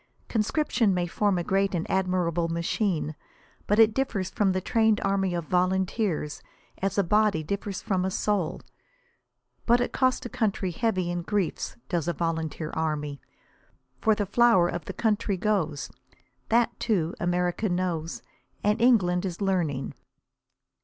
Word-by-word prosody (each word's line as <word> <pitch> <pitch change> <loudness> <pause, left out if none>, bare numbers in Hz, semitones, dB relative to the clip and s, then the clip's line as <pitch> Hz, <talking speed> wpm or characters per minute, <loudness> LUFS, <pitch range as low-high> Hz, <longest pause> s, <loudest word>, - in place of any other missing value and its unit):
Conscription 225 -2 +1
may 175 -1 0
form 200 +2 +1
a 175 - -1
great 195 +1 +1
and 165 - -2
admirable 180 -3 0
machine, 170 0 -1 0.5
but 210 - +2
it 225 -1 +6
differs 210 -8 -1
from 205 -4 +2
the 185 - 0
trained 220 +2 +2
army 195 -2 0
of 170 -2 -3
volunteers 185 -2 0 0.4
as 195 +1 -1
a 200 - +4
body 210 -3 +2
differs 200 +3 -4
from 185 -2 0
a 190 - 0
soul. 195 -3 -1 1.1
But 240 +1 +5
it 245 - -1
costs 255 -1 +1
a - - -1
country 200 -5 -1
heavy 185 -2 0
in 175 0 -2
griefs, 195 -1 -2
does 170 -3 -1
a 175 - +1
volunteer 160 -2 -3
army; 150 -3 -2 0.8
for 220 -2 +3
the 205 -1 -1
flower 205 -3 +4
of 175 - -4
the - - -5
country 210 -3 0
goes. 180 -8 -1 0.6
That, 235 +1 +2
too, 180 -7 0
America 180 +4 0
knows, 175 -2 -2 0.4
and 210 +2 +2
England 190 -8 +4
is 180 -3 -4
learning. 175 -9 -1
190 Hz, 145 wpm, -27 LUFS, 170-210 Hz, 1.1 s, it